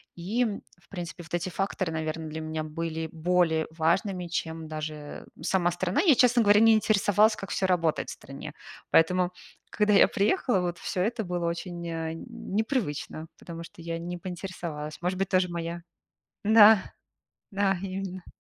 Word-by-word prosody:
И, 195 +8 -2
м, 210 -4 -3 0.2
в - - -28
принципе, 175 -2 -6
вот 170 - -15
эти 175 +2 -2
факторы, 185 -2 -2
наверно, 160 0 -3
для 160 +1 -5
меня 155 0 -3
были 160 +1 -4
более 165 -1 +1
важными, 175 +3 0
чем 165 -1 -4
даже 155 -1 -6
сама 175 -2 +2
страна. 180 +8 0
Я, 330 -7 +6
честно 245 -1 +5
говоря, 205 0 +6
не 225 0 +7
интересовалась, 215 0 +3
как 195 - -7
всё 190 - 0
работает 165 -4 +1
в - - -4
стране. 140 +2 -9 0.4
Поэтому, 180 +2 +4 0.4
когда 210 0 +2
я 195 - +7
приехала, 205 - +1
вот 175 -1 -3
всё 180 - -2
это 225 +2 -1
было 175 -2 -2
очень, 170 0 -4
э, 165 -1 -3
не - - -9 0.4
непривычно, 160 - -3
потому 170 -1 -8
что 165 - -13
я 165 0 -3
не 175 +1 -5
поинтересовалась. 170 -4 -6
Может 185 +1 -1
быть, 195 - 0
тоже 185 -1 +3
моя 170 0 -4 0.6
Да. 215 -1 +8 0.7
Да, 195 -2 +1
именно. 190 -1 -6
175 Hz, 165 wpm, -27 LUFS, 165-195 Hz, 0.7 s, Да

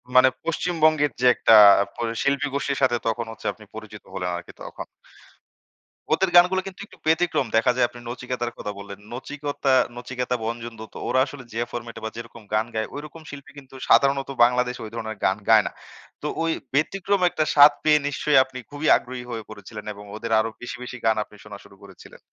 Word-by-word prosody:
মানে 130 +1 +7
পশ্চিমবঙ্গের 155 -3 +1
যে - - +2
একটা - - +4 0.4
প - - -26 0.3
শিল্পীগোষ্ঠীর 140 -1 -1
সাথে 130 -3 +3
তখন 115 +1 -1
হচ্ছে 115 - -13
আপনি - - -16
পরিচিত - - -10
হলেন 90 - -3
আরকি 85 - -10
তখন। - - -8 1.3
ওদের 190 +3 +2
গানগুলো 180 +2 +6
কিন্তু 190 - -10
একটু - - -19
ব্যতিক্রম 160 -4 +2
দেখা 115 +3 +4
যায় 125 -1 +3
আপনি 120 - -13
নচিকতার 120 -1 -4
কথা 105 - -5
বললেন। 100 0 -9
নচিকেতা- 140 +2 -2 0.2
নচিকেতা, 125 0 -3
বঞ্জন 115 0 -5
দত্ত 110 - -11
ওরা 130 - +2
আসলে 140 -2 -10
যে 115 - -3
ফরমেট 120 -1 -7
এ - - -18
বা - - -2
যেরকম 115 0 -9
গান 110 +1 +2
গায় 110 0 -1
ঐরকম 150 +3 -9
শিল্পী 140 -1 -10
কিন্তু 135 -1 -16
সাধারণত 140 0 +4
বাংলাদেশে 125 0 +1
ঐ - - -6
ধরনের 110 -2 -5
গান 95 - +2
গায় - - +7
না। - - -5 0.5
তো 150 - -3 0.2
ওই 165 - +1 0.2
ব্যতিক্রম 195 +7 0
একটা 155 - 0
স্বাদ 145 0 +9
পেয়ে 150 -1 +5
নিশ্চয়ই 145 +1 +1
আপনি 130 -1 -10
খুবই 145 +2 -4
আগ্রহী 125 0 -8
হয়ে 115 -3 -6
পড়েছিলেন 105 0 -10
এবং 105 0 -12
ওদের 115 +1 -6
আরো 110 +1 0
বেশি, 120 - -6
বেশি 125 0 -7
গান 110 -1 +4
আপনি 105 - -19
শোনা 105 -1 -10
শুরু - - -17
করেছিলেন। 95 -2 -15
125 Hz, 190 wpm, -24 LUFS, 115-145 Hz, 1.3 s, স্বাদ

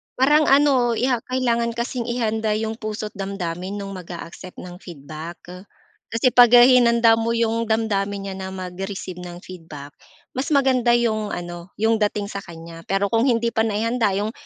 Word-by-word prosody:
Parang 295 +4 +4
ano, 270 -4 +4
'yeah, 250 +1 +1
kailangan 235 -2 0
kasing 235 0 -3
ihanda 220 -3 -1
'yong 220 +1 -3
puso't 215 -1 -5
damdamin 190 -1 -5
no'ng 200 -1 -6
mag-aaccept 180 0 -9
ng 180 0 -10
feedback. 160 0 -9 0.7
Kasi 235 +2 +1
'pag 245 +1 +8 0.2
hinanda 235 -2 +5
mo 230 +1 0
'yong 230 0 0
damdamin 205 -3 0
niya - - -6
na 190 - -5
mag-receive 185 0 -6
ng 175 0 -9
feedback, 155 -6 -10 0.4
mas 260 +2 -3
maganda 255 -3 +3
'yong 215 -3 0
ano, 175 0 -7
'yong 220 +1 +1
dating 210 -1 -1
sa 200 - -4
kanya. 165 -2 -11
Pero 195 +1 0
kung 230 +3 +2
hindi 235 -2 +1
pa 225 0 +1
naihanda, 220 -1 0
'yong 210 +2 -1
215 Hz, 160 wpm, -22 LUFS, 185-235 Hz, 0.7 s, pag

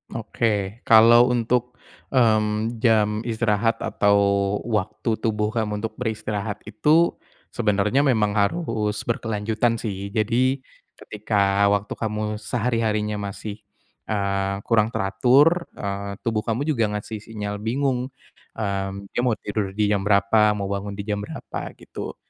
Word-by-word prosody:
Oke. 105 -2 -1
Kalau 115 +2 +7
untuk, 125 0 0 0.4
mmm, 110 -1 +2
jam 110 -3 +3
istirahat 115 0 +1
atau 105 -2 +2 0.5
waktu 110 0 -2
tubuh 105 -1 0
kamu 105 -2 -2
untuk 110 - -3
beristirahat 110 -3 -3
itu 155 +10 +3 0.4
sebenarnya 105 +2 +1
memang 110 -5 +2
harus 105 0 0
berkelanjutan 110 0 -1
sih. 100 -4 -4
Jadi 120 +6 +1 0.3
ketika 100 -1 +1
waktu 100 0 0
kamu 105 -1 -3
sehari-harinya 110 -2 -1
masih, 100 +1 -7 0.5
eee, 100 -2 -1
kurang 110 -2 +3
teratur, 130 - +3
eee, 100 0 -4
tubuh 115 -2 0
kamu 115 +4 -2
juga 135 -8 +1
ngasih 105 +1 -5
sinyal 105 -2 -5
bingung. 125 +3 -1 0.5
Mmm, 100 -2 -3
dia - - -3
mau 120 -2 +1
tidur 100 -2 -4
di 105 -1 +1
jam 100 -1 0
berapa, 105 +1 +4
mau 100 -1 -3
bangun 100 0 -3
di 100 - -5
jam 105 0 -2
berapa 105 - -7
gitu. - - -8
105 Hz, 125 wpm, -23 LUFS, 100-115 Hz, 0.5 s, Kalau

